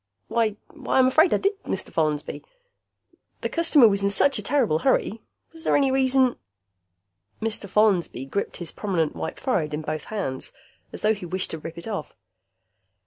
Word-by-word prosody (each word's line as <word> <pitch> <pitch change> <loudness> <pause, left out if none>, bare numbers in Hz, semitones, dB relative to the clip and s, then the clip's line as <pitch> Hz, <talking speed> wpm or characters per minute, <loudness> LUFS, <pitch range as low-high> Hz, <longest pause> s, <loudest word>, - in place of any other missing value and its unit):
"Why 225 -3 +1 0.2
why, 280 -5 -2
I'm 260 - +6
afraid 315 +7 +4
I - - +4
did, 395 0 -1
Mr. 190 - -4
Follansby. 155 -2 -1 1.0
The - - -2
customer 330 -7 +5
was 200 -1 +1
in 200 - +2
such 275 +8 +4
a - - -3
terrible 240 - +1
hurry. 225 -1 +1 0.3
Was 325 -1 -11
there - - +2
any 275 -2 +2
reason 260 -1 +3 0.5
" 95 +2 -49
Mr. 205 -2 -5
Follansby 190 - +2
gripped 200 +9 -3
his 170 -2 -5
prominent 180 -7 -1
white - - -5
forehead 160 - -1
in 155 - -5
both 155 0 -4
hands, 190 -12 -4 0.4
as - - -6
though 215 +1 +4
he 195 -4 -7
wished 185 +2 -2
to 160 - -5
rip 165 +2 -8
it 170 - -8
off. 200 -8 -5
200 Hz, 180 wpm, -24 LUFS, 160-260 Hz, 1.0 s, I'm